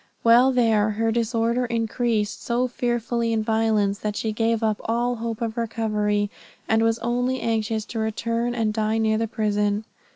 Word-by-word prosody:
While 240 +3 +6
there, 225 -4 +3
her 225 +2 0
disorder 235 +1 0
increased 230 -2 -1
so 245 +1 0
fearfully 240 -1 -1
in 220 -1 0
violence, 215 -2 +1
that 210 -1 -3
she 220 - -2
gave 225 +1 0
up 215 -2 0
all 240 +2 0
hope 230 0 -4
of 225 -1 -3
recovery, 210 -3 0 0.4
and 220 0 +3
was 225 0 +2
only 245 +2 0
anxious 220 -1 -1
to 230 - -5
return 230 +2 -1
and 220 -2 0
die 220 0 0
near 220 -1 +1
the 225 - 0
prison. 210 -1 0
225 Hz, 165 wpm, -24 LUFS, 215-235 Hz, 0.4 s, While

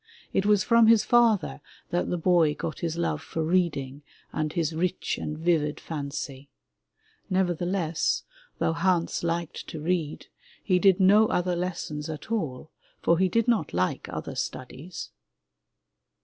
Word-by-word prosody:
It 195 - +1
was 205 -2 +4
from 230 -1 +5
his 225 -1 +6
father 225 - +3 0.3
that 175 - 0
the 175 - 0
boy 165 -3 +3
got 160 - -5
his 165 -1 -2
love 170 -3 -1
for 160 0 -3
reading 150 -5 0 0.3
and 155 0 -1
his 165 -1 -1
rich 180 +3 -1
and 150 - -4
vivid 160 -2 +1
fancy. 140 -2 -6 0.8
Nevertheless, 175 -2 0 0.3
though 160 - +1
Hans 170 0 +1
liked 170 -1 -3
to 160 - -6
read, 160 -1 -2 0.4
he 185 -3 +2
did 190 0 +5
no 205 +3 +6
other 180 -2 0
lessons 165 -4 -4
at 155 +7 -7
all, 155 - -3 0.3
for 170 0 +2
he 190 0 +3
did 230 +4 +1
not 230 - +1
like 90 +1 -1
other - - -5
studies. 135 +7 -6
170 Hz, 145 wpm, -27 LUFS, 155-185 Hz, 0.8 s, his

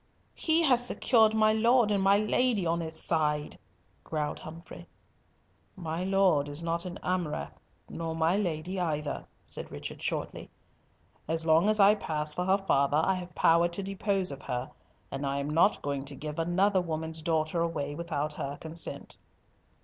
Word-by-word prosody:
"He 325 +1 +2
has 250 -5 +4
secured 220 -3 +3
my 215 0 +4
Lord 230 0 +4
and 200 -1 +2
my 195 +1 +5
Lady 215 -1 +1
on 170 +1 +1
his 160 -1 -4
side!" 150 -2 -1 0.4
growled 150 -2 -3
Humfrey. 165 +2 -10 0.9
"My 170 -1 -4
Lord 185 -7 +2
is 145 +3 -6
not 170 +1 -1
an 180 -1 -6
Amurath, 175 -4 -2 0.3
nor 165 -1 -4
my 165 +2 +2
Lady 180 -1 -2
either," 150 -4 -2 0.2
said - - -4
Richard, - - -7
shortly. - - -4 0.8
"As 160 +1 0
long 165 +5 +4
as 215 0 +2
I 200 +1 +7
pass 155 -6 -2
for 180 +3 -2
her 190 +1 +4
father 145 -7 +2
I 190 +5 +3
have 180 -1 -6
power 170 +1 +4
to 175 +3 -6
dispose 195 -1 -1
of 140 0 -8
her, 125 +3 -4 0.4
and 135 +1 -4
I 140 0 -1
am 140 +1 -2
not 170 +6 +3
going 140 -1 -2
to 140 0 -7
give 150 +3 -6
another 185 +4 +2
woman's 160 -1 -4
daughter 160 +1 0
away 145 -4 -2
without 155 -2 -3
her 140 -1 -5
consent." 160 +1 -2
165 Hz, 165 wpm, -29 LUFS, 155-195 Hz, 0.9 s, I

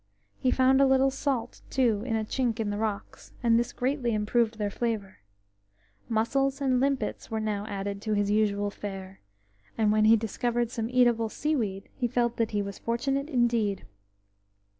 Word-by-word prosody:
He 255 - +1
found 260 +1 +4
a 275 - +6
little 265 0 +4
salt, 265 -3 -2
too, 235 -6 +2
in 225 - 0
a 220 - 0
chink 240 -1 -1
in 210 -2 -1
the 205 - -3
rocks, 215 -2 -4
and 230 -1 +4
this 240 - -1
greatly 250 -3 -1
improved 220 +2 +1
their 205 -2 -2
flavour. 215 -4 -3 0.9
Mussels 270 +5 +1
and 260 -3 +2
limpets 270 -5 -1
were 220 - -2
now 210 -1 -2
added 200 -1 -4
to 215 0 -1
his 205 0 +1
usual 205 -1 +1
fare, 195 -2 -8 0.6
and 215 -2 +3
when 215 0 +3
he 225 +1 +7
discovered 235 +2 -1
some 225 -2 -3
eatable 240 -3 +3
seaweed 220 -10 -2
he 245 - -1
felt 240 0 0
that 230 -1 +1
he 205 -1 -1
was 200 -1 -7
fortunate 275 +5 -1
indeed. 235 -7 +1
230 Hz, 170 wpm, -28 LUFS, 210-250 Hz, 0.9 s, he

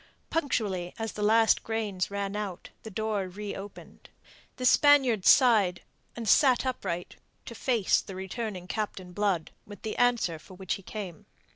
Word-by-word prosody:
Punctually 205 - -1
as 225 -1 -3
the 210 - -7
last 220 +2 +4
grains 215 -5 -2
ran 200 0 -3
out, 200 -4 -5
the 220 - -8
door 215 -1 -2
reopened. 200 +1 -9 0.5
The 255 - -4
Spaniard 260 -7 +5
sighed, 215 -9 +5 0.3
and 230 -2 -5
sat 260 +2 +5
upright 185 -9 -4 0.3
to - - -8
face 230 -3 +1
the 195 - -9
returning 190 0 -5
Captain 190 -3 -4
Blood 190 -4 -1 0.2
with 205 0 -12
the 220 - -3
answer 235 -10 +2
for 185 +4 -14
which 190 -1 -3
he - - -5
came. 190 -4 -8
210 Hz, 150 wpm, -28 LUFS, 190-225 Hz, 0.5 s, Spaniard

